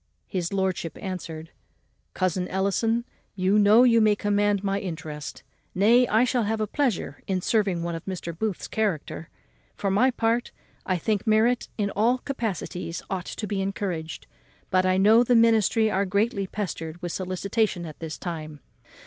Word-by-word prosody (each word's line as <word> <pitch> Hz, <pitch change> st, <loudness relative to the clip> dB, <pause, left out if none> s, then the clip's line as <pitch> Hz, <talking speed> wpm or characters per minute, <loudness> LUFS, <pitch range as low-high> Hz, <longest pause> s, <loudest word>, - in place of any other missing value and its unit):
His 180 Hz, -4 st, -3 dB
lordship 190 Hz, -4 st, -1 dB
answered, 165 Hz, -4 st, -6 dB, 0.6 s
"Cousin 185 Hz, -1 st, 0 dB
Ellison, 225 Hz, +5 st, 0 dB, 0.3 s
you 190 Hz, +2 st, +3 dB
know 210 Hz, +4 st, +6 dB
you 230 Hz, -2 st, +5 dB
may 215 Hz, -1 st, +4 dB
command 205 Hz, -1 st, +1 dB
my 195 Hz, 0 st, 0 dB
interest; 155 Hz, -5 st, -6 dB, 0.3 s
nay, 235 Hz, +6 st, +5 dB
I 220 Hz, +2 st, +3 dB
shall 250 Hz, 0 st, +1 dB
have 220 Hz, +1 st, -1 dB
a 215 Hz, -, +1 dB
pleasure 215 Hz, -, -1 dB
in 190 Hz, -1 st, 0 dB
serving 195 Hz, -3 st, +1 dB
one 170 Hz, 0 st, -2 dB
of 165 Hz, -, -5 dB
Mr. 175 Hz, -3 st, -5 dB
Booth's 205 Hz, +1 st, -3 dB
character: 185 Hz, -7 st, -2 dB, 0.5 s
for 195 Hz, -, -1 dB
my 215 Hz, +7 st, +4 dB
part, 235 Hz, -1 st, 0 dB, 0.4 s
I 185 Hz, -, +1 dB
think 210 Hz, +4 st, -1 dB
merit 225 Hz, +3 st, +3 dB
in 205 Hz, -2 st, 0 dB
all 235 Hz, +5 st, +2 dB
capacities 210 Hz, -, -4 dB
ought 185 Hz, -1 st, -3 dB
to 215 Hz, -, -5 dB
be 200 Hz, -1 st, -2 dB
encouraged, 190 Hz, -5 st, -4 dB, 0.5 s
but 185 Hz, 0 st, +3 dB
I 185 Hz, 0 st, +3 dB
know 215 Hz, +5 st, +6 dB
the 245 Hz, 0 st, +3 dB
ministry 225 Hz, -1 st, +4 dB
are 200 Hz, 0 st, +1 dB
greatly 200 Hz, 0 st, 0 dB
pestered 175 Hz, -5 st, -5 dB
with 175 Hz, -, -3 dB
solicitations 185 Hz, +1 st, -1 dB
at 155 Hz, -2 st, -9 dB
this 160 Hz, -1 st, -6 dB
time. 155 Hz, -4 st, -6 dB
200 Hz, 160 wpm, -25 LUFS, 180-220 Hz, 0.6 s, know